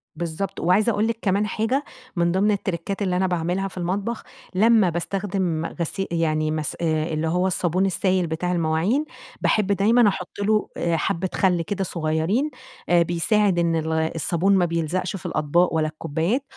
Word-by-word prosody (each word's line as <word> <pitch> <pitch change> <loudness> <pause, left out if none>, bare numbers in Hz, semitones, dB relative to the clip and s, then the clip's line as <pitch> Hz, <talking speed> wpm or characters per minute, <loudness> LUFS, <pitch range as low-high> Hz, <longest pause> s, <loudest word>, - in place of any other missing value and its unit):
بالضبط، 170 +2 -4
وعايزة 200 +7 +3
أقول 210 +1 +1
لِك 230 0 -1
كمان 200 +1 +1
حاجة 225 +7 0 0.3
من 170 -1 +2
ضمن 195 +4 +2
التريكات 195 -1 -3
اللي 185 -3 0
أنا 190 +1 +2
باعملها 180 +2 -1
في 190 - -12
المطبخ، 195 +6 -2 0.3
لمّا 215 -1 +5
باستخدم 180 -1 -2
غسي 180 +3 -3
يعني 155 -2 0
مس 155 -2 -2
اللي 155 -1 0
هو 180 +3 +1
الصابون 180 0 +1
السايل 185 -1 +1
بتاع 165 +3 -2
المواعين، 175 - +1 0.4
باحب 210 -3 +2
دايمًا 215 +4 +4
أحط 190 -2 -3
له 210 +1 +1 0.3
حبة 170 +3 -1
خلّ 180 -3 +2
كده 195 +3 -2
صغيرين، 170 - 0 0.4
آآ 175 0 +5
بيساعد 175 +3 +1
إن 170 -1 +2
ال 160 0 -1
الصابون 165 +4 +1
ما 180 -2 +3
بيلزقش 170 +3 -2
في 185 - -9
الأطباق 160 +4 +1
ولا 155 -1 +1
الكوبايات، 165 - -2
180 Hz, 160 wpm, -23 LUFS, 165-200 Hz, 0.4 s, لمّا